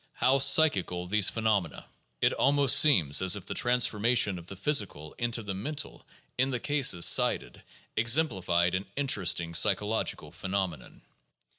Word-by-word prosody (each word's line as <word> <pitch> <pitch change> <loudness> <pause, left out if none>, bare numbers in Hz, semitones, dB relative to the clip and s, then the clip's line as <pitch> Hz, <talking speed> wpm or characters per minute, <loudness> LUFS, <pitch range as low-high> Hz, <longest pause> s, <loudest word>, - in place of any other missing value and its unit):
How 130 +3 0
"psychical" 95 - +2
these 100 +1 +2
phe 115 - -7
nomena! 100 -8 -2 0.4
It - - +1
almost 140 -1 +2
seems 85 - +3
as 95 0 +3
if 105 - -10
the - - -6
transformation 115 -4 +1
of 85 - -16
the 100 - -8
physical 95 - -2
into 120 -1 -2
the 100 -1 -6
mental 145 +11 -6 0.3
in 130 +1 +1
the 125 -2 -3
cases 130 - +1
cited - - +1 0.3
exemplified 105 - +1
an 95 +2 -4
interesting 90 -11 0
psy 100 +4 +3
chological 105 +3 -4
phenomenon. 95 -3 -6
105 Hz, 145 wpm, -27 LUFS, 90-130 Hz, 0.4 s, seems